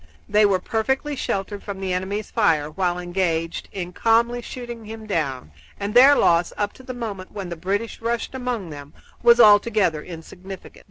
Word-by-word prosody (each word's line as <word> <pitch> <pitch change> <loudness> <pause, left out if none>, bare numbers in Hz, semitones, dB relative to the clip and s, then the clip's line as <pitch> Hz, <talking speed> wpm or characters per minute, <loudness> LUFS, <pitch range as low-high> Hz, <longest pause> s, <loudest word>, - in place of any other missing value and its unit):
They 210 0 +4
were 195 -2 +2
perfectly 265 +9 -1
sheltered 200 -4 -3
from 200 -2 -6
the 190 -1 -2
enemy's 195 +3 -3
fire 160 -9 +2
while 175 +1 -1
engaged 175 -2 -2
in 180 -2 -5
calmly 235 +3 +2
shooting 240 -2 -8
him 220 0 -8
down, 140 - -2 0.3
and 200 +1 -3
their 265 +4 +8
loss, 170 -6 +3
up 205 0 -1
to - - -15
the 255 -1 -7
moment 205 -6 -6
when 195 -3 -5
the 170 - -4
British 200 +8 -3
rushed 235 +2 -2
among 245 -9 -4
them, 145 0 -10 0.3
was 235 0 +6
altogether 205 -6 +5
insignificant. 180 +3 -10
200 Hz, 170 wpm, -23 LUFS, 175-230 Hz, 0.3 s, their